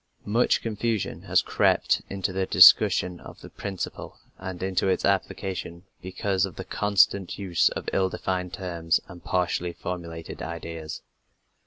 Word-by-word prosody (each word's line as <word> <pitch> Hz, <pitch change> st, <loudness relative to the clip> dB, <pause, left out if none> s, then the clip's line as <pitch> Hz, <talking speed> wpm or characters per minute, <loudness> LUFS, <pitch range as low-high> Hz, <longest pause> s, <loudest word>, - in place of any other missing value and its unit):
Much 115 Hz, +4 st, +2 dB
confusion 115 Hz, -1 st, -2 dB
has -, -, +2 dB
crept -, -, +2 dB
into 95 Hz, -1 st, -3 dB
the 95 Hz, 0 st, -1 dB
discussion 90 Hz, -1 st, +6 dB
of -, -, -13 dB
the -, -, -12 dB
principle 100 Hz, -3 st, -6 dB, 0.2 s
and 95 Hz, -1 st, -6 dB
into 95 Hz, 0 st, 0 dB
its 95 Hz, -, +1 dB
application 95 Hz, -3 st, -2 dB, 0.2 s
because 95 Hz, +1 st, -1 dB
of 95 Hz, -4 st, -2 dB
the -, -, -7 dB
constant 100 Hz, -2 st, +2 dB
use 95 Hz, -4 st, +2 dB
of -, -, -6 dB
ill 95 Hz, -1 st, +2 dB
defined 90 Hz, -1 st, -3 dB
terms 85 Hz, -4 st, -1 dB
and 90 Hz, -4 st, -12 dB
partially 90 Hz, +1 st, -1 dB
formulated 85 Hz, -2 st, -7 dB
ideas. 80 Hz, -2 st, -6 dB
95 Hz, 140 wpm, -26 LUFS, 85-95 Hz, 0.2 s, discussion